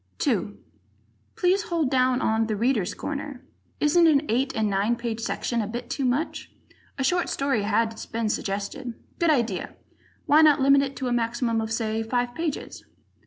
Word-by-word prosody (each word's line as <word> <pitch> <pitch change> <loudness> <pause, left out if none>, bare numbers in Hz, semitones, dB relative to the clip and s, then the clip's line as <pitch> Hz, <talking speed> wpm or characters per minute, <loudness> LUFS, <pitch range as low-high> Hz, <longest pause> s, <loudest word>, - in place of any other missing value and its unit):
2 - - -1 0.8
Please 370 +2 +2
hold 330 -8 -1
down 255 -1 +2
on 220 0 +1
"The 215 - -1
Readers' 225 -3 0
Corner." 280 -3 -6 0.3
Isn't 330 +3 +4
an 295 -2 +4
eight 260 +4 +1
and 220 -1 +1
nine 205 +4 +1
page 235 -1 -4
section 235 +1 -1
a 210 - -3
bit 240 +2 -6
too 270 +1 -1
much? 255 +6 -2 0.5
A 270 - -1
short 355 +6 +1
story 275 -5 0
has 220 +2 -1
been 230 -1 -2
suggested 210 +5 -3 0.2
good 340 - +3
idea. 235 - 0 0.5
Why 300 0 +6
not 305 -2 +6
limit 275 +1 +5
it 275 0 -3
to 260 - -3
a 245 - 0
maximum 235 -1 0
of, 220 0 -4
say, 225 -1 -1
five 245 +2 -1
pages? 325 -1 -4
245 Hz, 170 wpm, -25 LUFS, 225-280 Hz, 0.8 s, Why